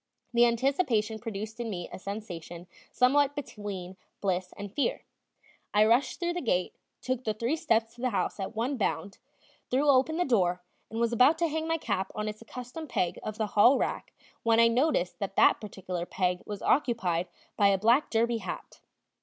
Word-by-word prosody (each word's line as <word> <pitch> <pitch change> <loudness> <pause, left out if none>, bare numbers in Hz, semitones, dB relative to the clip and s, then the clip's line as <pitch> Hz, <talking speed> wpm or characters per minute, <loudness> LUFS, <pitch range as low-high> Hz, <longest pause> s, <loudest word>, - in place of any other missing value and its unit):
The 240 0 +6
anticipation 235 -3 +1
produced 220 0 -6
in 235 -1 -3
me 175 -4 -4
a - - -7
sensation 180 -4 -7 0.3
somewhat 280 +3 +3
between 200 -9 -6 0.2
bliss 185 -2 -1
and 205 -1 -7
fear. 285 - -1 0.7
I 210 +1 +6
rushed 240 +4 +2
through 345 -1 -1
the 355 - -3
gate, 185 -8 0 0.3
took 255 -1 -2
the 215 -2 -1
three 235 +7 0
steps 230 -8 +1
to 240 - -13
the 255 - +1
house 205 -1 -1
at 195 +3 -4
one 250 +5 -1
bound, 195 -3 -2 0.5
threw 270 +4 +2
open 275 +4 +3
the 355 - +1
door, 180 -8 +1 0.3
and 225 - -4
was 235 0 +1
about 255 +7 +5
to 335 0 +1
hang 320 +1 -2
my 325 0 +1
cap 200 -10 -2
on 215 0 -2
its 215 +1 -6
accustomed 250 +7 -8
peg 175 -2 -1
of 215 0 -5
the 220 - 0
hall 240 +6 +6
rack - - -2 0.3
when 230 0 +3
I 230 0 +6
noticed 235 - +1
that 195 -2 -4
that - - +5
particular 185 -4 -5
peg 180 -1 0
was 205 -2 -6
occupied 190 - +1 0.3
by 200 - +4
a 200 -1 +4
black 235 +8 +3
derby 230 0 +1
hat. - - -7
225 Hz, 185 wpm, -29 LUFS, 195-255 Hz, 0.7 s, The